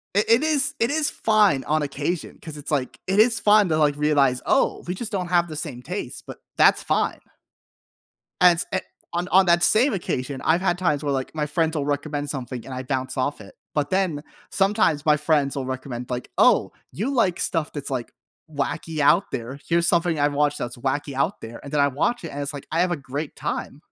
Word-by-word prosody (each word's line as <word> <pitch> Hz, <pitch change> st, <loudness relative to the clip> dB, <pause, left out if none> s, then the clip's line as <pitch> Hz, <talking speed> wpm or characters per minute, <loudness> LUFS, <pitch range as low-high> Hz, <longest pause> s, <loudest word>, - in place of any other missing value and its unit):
i 205 Hz, -, +4 dB
it 230 Hz, +6 st, +4 dB
is 300 Hz, -4 st, +2 dB
it 230 Hz, -, +2 dB
is 300 Hz, 0 st, +2 dB
fine 210 Hz, -11 st, +2 dB
on 155 Hz, 0 st, +1 dB
occasion 145 Hz, +4 st, -3 dB
'cause 155 Hz, -2 st, -8 dB
it's, 145 Hz, +1 st, -6 dB
like, 135 Hz, -4 st, -2 dB
it 195 Hz, +2 st, +1 dB
is 230 Hz, +1 st, +5 dB
fun 210 Hz, -2 st, +4 dB
to, 155 Hz, -, +1 dB
like, 150 Hz, -2 st, +2 dB
realize, 145 Hz, -4 st, +2 dB
"Oh, -, -, +1 dB
we 180 Hz, -, -1 dB
just 225 Hz, +2 st, -5 dB
don't 185 Hz, -4 st, -2 dB
have 175 Hz, -1 st, +2 dB
the 155 Hz, -, -7 dB
same 145 Hz, -5 st, -4 dB
taste, 180 Hz, +9 st, -6 dB
but -, -, -8 dB, 0.2 s
that's -, -, +5 dB
fine." -, -, 0 dB, 1.2 s
And 175 Hz, -2 st, +6 dB
a 190 Hz, -, +1 dB, 0.3 s
on 175 Hz, +1 st, -2 dB
on 190 Hz, +1 st, +5 dB
that 170 Hz, 0 st, +4 dB
same 250 Hz, +4 st, +5 dB
occasion, 135 Hz, -7 st, -3 dB
I've 165 Hz, +3 st, +3 dB
had 180 Hz, -2 st, +1 dB
times 155 Hz, -6 st, 0 dB
where, 145 Hz, -, 0 dB
like, 130 Hz, -1 st, -3 dB
my 150 Hz, -1 st, -1 dB
friends 160 Hz, +1 st, 0 dB
will 140 Hz, -, -1 dB
recommend 145 Hz, 0 st, -2 dB
something, 130 Hz, -3 st, -5 dB
and 130 Hz, -, -8 dB
I 130 Hz, -, -5 dB
bounce 130 Hz, 0 st, -3 dB
off 140 Hz, +3 st, -1 dB
it, 100 Hz, -, -14 dB, 0.2 s
but 145 Hz, -2 st, -1 dB
then 185 Hz, -6 st, 0 dB, 0.3 s
sometimes 195 Hz, -7 st, +2 dB
my 150 Hz, -1 st, +5 dB
friends 150 Hz, -2 st, +1 dB
will 135 Hz, -2 st, -3 dB
recommend, 130 Hz, -1 st, -6 dB
like, 125 Hz, 0 st, -4 dB
"Oh, -, -, +4 dB, 0.2 s
you 225 Hz, +9 st, -3 dB
like 190 Hz, -9 st, +1 dB
stuff 165 Hz, -4 st, 0 dB
that's, 145 Hz, -2 st, -4 dB
like, 130 Hz, -3 st, -4 dB, 0.4 s
wacky 155 Hz, +2 st, -3 dB
out 150 Hz, +7 st, +3 dB
there. 125 Hz, +4 st, -5 dB
Here's 170 Hz, 0 st, +2 dB
something 170 Hz, -2 st, +2 dB
I 145 Hz, -, +4 dB
watch 145 Hz, 0 st, 0 dB
that's 120 Hz, 0 st, -5 dB
wacky 140 Hz, +3 st, -2 dB
out 140 Hz, +9 st, -1 dB
there," 115 Hz, +1 st, -9 dB
and 140 Hz, -, -9 dB
then 145 Hz, -, +1 dB
I 140 Hz, -, +5 dB
watch 160 Hz, -, -1 dB
it, -, -, -5 dB
and 145 Hz, -, -5 dB
it's 140 Hz, +1 st, -2 dB
like, 145 Hz, -, -9 dB
I 165 Hz, +2 st, +1 dB
have 180 Hz, -, +1 dB
a 175 Hz, -, -1 dB
great 140 Hz, +3 st, -6 dB
time. -, -, -4 dB
150 Hz, 220 wpm, -23 LUFS, 140-180 Hz, 1.2 s, And